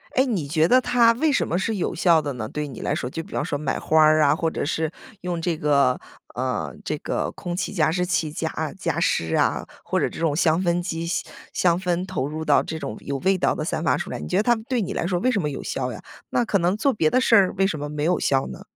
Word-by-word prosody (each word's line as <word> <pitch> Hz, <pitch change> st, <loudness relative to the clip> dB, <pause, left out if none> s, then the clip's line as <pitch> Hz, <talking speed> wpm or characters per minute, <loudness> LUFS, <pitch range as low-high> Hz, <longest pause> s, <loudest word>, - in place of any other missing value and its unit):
诶， 260 Hz, -, +4 dB
你 195 Hz, -, -2 dB
觉 155 Hz, +2 st, +2 dB
得 255 Hz, +5 st, +6 dB
它 245 Hz, -2 st, +4 dB
为 300 Hz, +5 st, +1 dB
什 -, -, +1 dB
么 175 Hz, -, 0 dB
是 220 Hz, +3 st, -1 dB
有 190 Hz, -, -1 dB
效 165 Hz, -2 st, +4 dB
的 145 Hz, -2 st, -4 dB
呢？ 110 Hz, -3 st, -5 dB
对 150 Hz, +3 st, -4 dB
你 130 Hz, -, -9 dB
来 -, -, -1 dB
说， 125 Hz, -, -3 dB
就 165 Hz, -, -4 dB
比 -, -, -14 dB
方 -, -, -1 dB
说 145 Hz, -2 st, -2 dB
买 140 Hz, -2 st, -2 dB
花 155 Hz, 0 st, +3 dB
儿 155 Hz, 0 st, +5 dB
啊， 145 Hz, 0 st, +4 dB
或 165 Hz, 0 st, 0 dB
者 -, -, -3 dB
是 160 Hz, 0 st, -1 dB, 0.3 s
用 175 Hz, -2 st, -3 dB
这 165 Hz, -2 st, -1 dB
个 140 Hz, -4 st, +2 dB, 0.4 s
呃， -, -, -2 dB
这 -, -, -2 dB
个 -, -, -2 dB
空 175 Hz, -1 st, -5 dB
气 185 Hz, -, -3 dB
加 160 Hz, -4 st, +2 dB
湿 180 Hz, +1 st, 0 dB
器 170 Hz, -4 st, 0 dB
加 160 Hz, 0 st, -3 dB, 0.3 s
加 165 Hz, -2 st, -1 dB
湿 80 Hz, -, +1 dB
啊， -, -, +1 dB, 0.2 s
或 -, -, 0 dB
者 -, -, +1 dB
这 -, -, -9 dB
种 160 Hz, -3 st, +1 dB
香 165 Hz, +1 st, +2 dB
氛 175 Hz, 0 st, +1 dB
机 165 Hz, -2 st, -3 dB
香 170 Hz, -, -2 dB, 0.3 s
香 175 Hz, -1 st, +2 dB
氛 180 Hz, 0 st, -1 dB
投 185 Hz, -8 st, -2 dB
入 155 Hz, +1 st, -5 dB
到 145 Hz, -, +4 dB
这 160 Hz, 0 st, -5 dB
种 110 Hz, -, -5 dB
有 140 Hz, -1 st, -4 dB
味 190 Hz, +3 st, +2 dB
道 -, -, +2 dB
的 155 Hz, -, -4 dB
散 160 Hz, -, -2 dB
发 -, -, +2 dB
出 -, -, -5 dB
来。 -, -, -5 dB
你 -, -, -6 dB
觉 180 Hz, -, 0 dB
得 210 Hz, -, +3 dB
它 240 Hz, +1 st, +4 dB
对 250 Hz, -3 st, +1 dB
你 200 Hz, +1 st, -3 dB
来 -, -, -2 dB
说 175 Hz, -1 st, 0 dB
为 255 Hz, -, +1 dB
什 205 Hz, -7 st, +1 dB
么 150 Hz, -, -1 dB
有 140 Hz, -, -5 dB
效 -, -, -3 dB
呀？ -, -, -8 dB, 0.3 s
那 240 Hz, -, +1 dB
可 200 Hz, -, +2 dB
能 180 Hz, +4 st, +1 dB
做 275 Hz, +3 st, +2 dB
别 160 Hz, -7 st, +2 dB
的 255 Hz, -, +3 dB
事 235 Hz, -3 st, +4 dB
儿 195 Hz, -3 st, +5 dB
为 195 Hz, 0 st, +3 dB
什 155 Hz, -, -3 dB
么 145 Hz, 0 st, -4 dB
没 150 Hz, 0 st, -3 dB
有 175 Hz, +3 st, +2 dB
效 135 Hz, -1 st, +1 dB
呢？ -, -, -9 dB
170 Hz, 305 characters per minute, -23 LUFS, 150-190 Hz, 0.4 s, 得